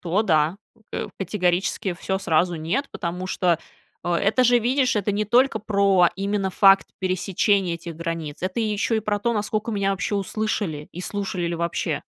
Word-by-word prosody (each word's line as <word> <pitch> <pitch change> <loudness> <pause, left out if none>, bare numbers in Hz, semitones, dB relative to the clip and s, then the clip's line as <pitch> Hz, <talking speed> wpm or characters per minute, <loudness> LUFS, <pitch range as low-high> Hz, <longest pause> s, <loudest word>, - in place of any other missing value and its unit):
то 180 +5 +1
да, 160 -3 +2 0.4
э, - - -3
категорически 180 0 0
всё 190 +2 -2
сразу 175 -1 +1
нет, 175 - -2
потому 180 +1 -4
что, 180 -3 +1 0.5
э, 175 - 0
это 215 +8 +2
же, 245 0 +5
видишь, 255 +1 +1
это 205 0 0
не 210 +1 0
только 240 +2 +3
про 200 -4 +3
именно 195 0 -1
факт 195 +1 +5
пересечения 185 0 +1
этих 170 -1 -8
границ, 165 -2 -5
это 185 +5 -1
еще 215 +1 0
и - - 0
про 210 -1 -1
то, 235 +3 0
насколько 215 +1 -2
меня 200 -2 0
вообще 195 +2 -2
услышали, 200 -6 -2
и 175 - -7
слушали 190 -2 -3
ли 170 - -2
вообще. 170 0 -2
195 Hz, 175 wpm, -23 LUFS, 175-210 Hz, 0.5 s, же